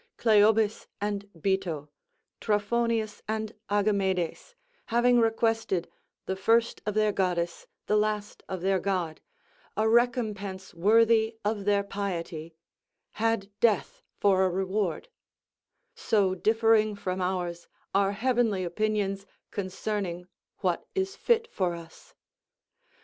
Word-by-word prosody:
Cleobis 215 -1 +3
and 205 -1 -3
Bito, 175 -5 -1 0.5
Trophonius 220 +1 0
and 220 0 -2 0.2
Agamedes, 200 - 0 0.3
having 240 +1 +4
requested, 225 -5 +1 0.4
the 190 - -2
first 230 +4 +2
of 210 - -1
their 215 -1 +3
goddess, 175 -3 -1 0.2
the 210 - +1
last 210 0 -1
of 190 -2 -4
their 190 +1 +2
god, 180 -4 -2 0.6
a 215 +1 +2
recompense 220 -5 0
worthy 220 +4 +4
of 205 -2 -1
their 205 -1 +3
piety, 170 -5 -4 0.7
had 225 -3 +1
death 225 -3 +1 0.2
for 190 -2 +3
a 190 - +3
reward; 190 - -1 0.9
so 200 -4 +1
differing 220 +2 +3
from 185 -2 -3
ours 175 -2 -2 0.3
are 195 0 +3
heavenly 230 -3 +1
opinions 200 +1 -1 0.2
concerning 190 -2 -3 0.4
what - - 0
is 385 +1 -1
fit 460 -1 +2
for 180 -3 0
us. 170 - -13
205 Hz, 110 wpm, -28 LUFS, 190-225 Hz, 0.9 s, having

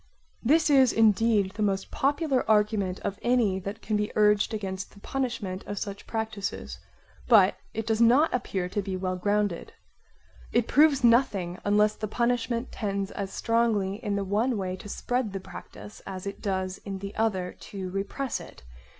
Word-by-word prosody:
This 305 +5 +3
is 265 -4 +6
indeed 220 -2 +3
the 215 - -5
most 195 -2 0
popular 285 -1 +1
argument 210 -3 +2
of 200 +1 -4
any 235 -6 +2
that 200 +4 -7
can 215 - -1
be 210 0 -1
urged 210 0 +3
against 190 -3 -4
the - - -14
punishment 230 -7 -3
of 205 - -4
such 200 0 -5
practises; 220 -2 -4 0.5
but 205 -5 +6 0.2
it 225 0 -2
does 225 0 0
not 255 +7 +5
appear 195 -7 -1
to 205 +3 -2
be 190 -1 -4
well 185 0 -2
grounded. 205 -1 -1 0.8
It 235 -1 +2
proves 290 -2 +4
nothing 205 -7 +3
unless 210 +1 +3
the 215 0 -5
punishment 240 +2 -1
tends 200 -2 -3
as 200 -2 -5
strongly 225 -2 0
in 205 -2 -1
the 200 - -1
one 220 +5 +1
way 185 -2 -2
to 205 - -10
spread 245 -1 -2
the 195 - -3
practise 205 +2 -11
as 190 -1 -6
it 200 - -6
does 190 -2 -2
in 195 -1 -6
the 200 +1 -7
other 190 -5 -1
to 190 -2 -5
repress 200 +7 -3
it. - - -13
210 Hz, 170 wpm, -27 LUFS, 195-230 Hz, 0.8 s, is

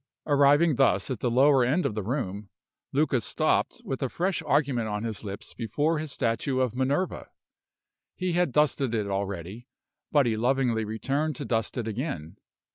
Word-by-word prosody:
Arriving 145 +1 +4
thus 95 +7 +2
at 125 - -3
the 125 - 0
lower 135 +2 +5
end 145 +9 +1
of - - 0
the 105 - -2
room, 105 -3 -3 0.4
Luca 140 -3 +2
stopped - - 0
with 135 - -4
a 135 - 0
fresh 180 +3 -1
argument 140 -6 +1
on 105 0 -3
his 110 -2 -3
lips 100 -1 -7
before 145 +8 -1
his 155 -2 -4
statue 130 +3 -1
of 130 -4 +1
Minerva. 135 +8 -1 0.9
He 185 -1 -2
had 175 -4 +2
dusted 140 -3 +2
it 105 -2 0
already, 100 +3 -4 0.4
but 145 -3 +4
he 115 -2 +1
lovingly 120 -1 +1
returned 135 +8 -1
to - - -5
dust 115 0 -1
it 115 -2 -2
again. 105 - -4
125 Hz, 170 wpm, -27 LUFS, 110-145 Hz, 0.9 s, lower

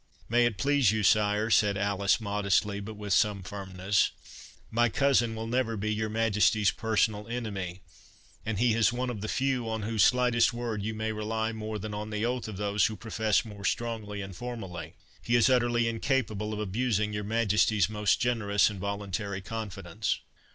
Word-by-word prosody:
"May 120 +1 +4
it 110 -4 -3
please 140 -6 +3
you, 110 -1 -1
sire," 105 +2 +3
said 100 -2 +4
Alice, 100 +1 +1
modestly, 100 -1 0
but 105 +2 -7
with 105 -2 -3
some 100 +2 +2
firmness, 95 0 0 0.6
"my 120 +1 +3
cousin 120 -4 +2
will 110 0 -4
never 115 -1 -1
be 105 +2 -1
your 110 0 -2
Majesty's 110 -2 +2
personal 110 -1 0
enemy—and 95 - -7
he 120 +1 +3
is 115 +1 +3
one 125 +1 -2
of 105 -4 -6
the 110 - -3
few 130 -2 0
on 110 -1 -3
whose 110 0 0
slightest 125 +1 +4
word 120 -3 -3
you 110 +2 -3
may 110 +1 -2
rely 110 +1 -2
more 110 -1 -5
than 105 +1 -6
on 105 +1 -4
the 105 +1 -2
oath 125 0 -2
of 105 -3 -7
those 105 0 +2
who 110 - -5
profess 110 +2 0
more 105 -2 -10
strongly 105 -2 -2
and 95 -1 -8
formally. 90 -9 -7 0.3
He 120 +6 +1
is 120 +2 +5
utterly 120 -2 +2
incapable 115 -3 -1
of 105 - -3
abusing 105 0 0
your 105 0 -3
Majesty's 105 -2 +2
most 105 -1 +1
generous 110 -5 +2
and 100 - -8
voluntary 100 0 -3
confidence." 100 -2 -3
110 Hz, 175 wpm, -29 LUFS, 100-115 Hz, 0.6 s, is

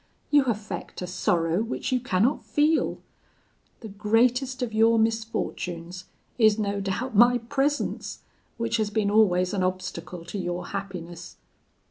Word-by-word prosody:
You 290 -2 +5
affect 210 -6 -4
a - - -2
sorrow 175 0 0
which 235 +4 -3
you 255 - +2
cannot 240 +2 +1
feel. 305 +2 +1 0.8
The 225 - -7
greatest 245 +5 +1
of 230 -3 -4
your 225 +1 +4
misfortunes 185 -6 -2 0.3
is 215 -2 +5
no 200 -2 -1
doubt 210 +6 -3
my 240 +3 +6
presence, 275 +5 -2 0.3
which 230 0 0
has 215 -2 0
been 210 -1 0
always 185 -3 +3
an 195 - 0
obstacle 180 -2 -4
to 195 +4 -5
your 175 0 -4
happiness. 180 -4 -7
210 Hz, 135 wpm, -26 LUFS, 185-235 Hz, 0.8 s, my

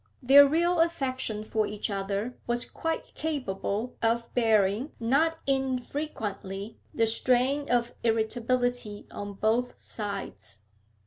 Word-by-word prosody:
Their 280 +3 +9
real 340 +4 +2
affection 260 -9 0
for 215 0 0
each 210 0 -3
other 200 +4 -2
was 240 0 0
quite 325 0 -4
capable 250 -6 -2
of 230 +1 0
bearing 220 +2 +2
not 285 +8 +2
infrequently 250 -7 -3
the 230 - +2
strain 255 +5 +1
of 240 -1 +1
irritability 235 0 0
on 205 0 -6
both 225 +5 0
sides. 200 - -6
240 Hz, 110 wpm, -28 LUFS, 210-270 Hz, -, Their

